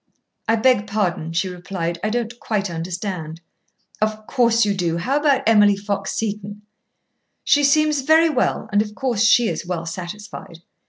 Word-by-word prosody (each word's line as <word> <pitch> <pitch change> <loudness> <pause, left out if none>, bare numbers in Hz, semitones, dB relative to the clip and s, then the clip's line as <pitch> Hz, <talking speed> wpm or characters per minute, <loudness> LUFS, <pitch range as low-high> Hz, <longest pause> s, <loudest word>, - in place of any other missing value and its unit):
"I 225 - +3
beg 225 -2 +2
pardon," 180 -6 -1
she 170 +3 0
replied. 175 -2 -4
"I 215 - +1
don't 240 +1 -3
quite 205 -4 -2
understand." 170 -1 -5 0.6
"Of 215 0 -1
course 235 -3 +2
you 205 - +1
do. 170 -3 -1
How 265 +12 0
about 290 -3 +2
Emily 210 -2 +5
Fox 200 -1 -3
Seton?" 210 -1 -4 0.8
"She 290 - +3
seems 300 0 +3
very 315 +4 +5
well, 275 -6 0
and 205 0 +3
of 210 0 -5
course 245 -6 -1
she 230 +1 +5
is - - -3
well 170 -2 -3
satisfied. 175 -1 -8
210 Hz, 160 wpm, -21 LUFS, 180-235 Hz, 0.8 s, Emily